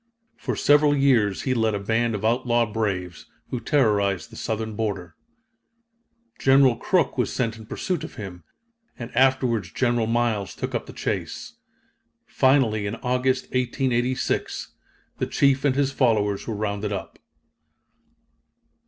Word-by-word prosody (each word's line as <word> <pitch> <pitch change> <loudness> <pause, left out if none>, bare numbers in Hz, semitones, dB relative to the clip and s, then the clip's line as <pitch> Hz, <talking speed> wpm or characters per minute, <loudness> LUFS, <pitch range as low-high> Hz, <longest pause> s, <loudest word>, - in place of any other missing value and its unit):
For - - -3
several 145 0 +4
years 120 -8 +2
he 130 - +1
led 110 -3 +1
a - - -2
band 115 +3 0
of 105 +1 -4
outlaw 120 0 +2
braves, 100 -5 -3 0.2
who 125 - -2
terrorized 105 - +1
the - - -12
Southern 110 -1 -3
border. 100 -6 -3 1.3
General 135 -2 +5
Crook 150 - 0
was 125 - +1
sent 115 -3 -1
in 110 -1 -12
pursuit 180 - -3
of - - -8
him, 90 -5 -8 0.5
and 120 -2 -8
afterwards 125 -7 +2
General 120 -3 +1
Miles 115 -4 0
took - - -4
up - - -3
the - - -8
chase. - - -4 0.7
Finally 120 -6 +2
in 100 - -3
August, 125 +1 +1
1886, 125 0 -1 0.5
the - - -1
chief 140 -1 +2
and 140 -3 +2
his 140 -1 +1
followers 110 -7 +1
were 115 - -2
rounded 105 0 -2
up. 100 - -6
115 Hz, 135 wpm, -24 LUFS, 105-130 Hz, 1.3 s, General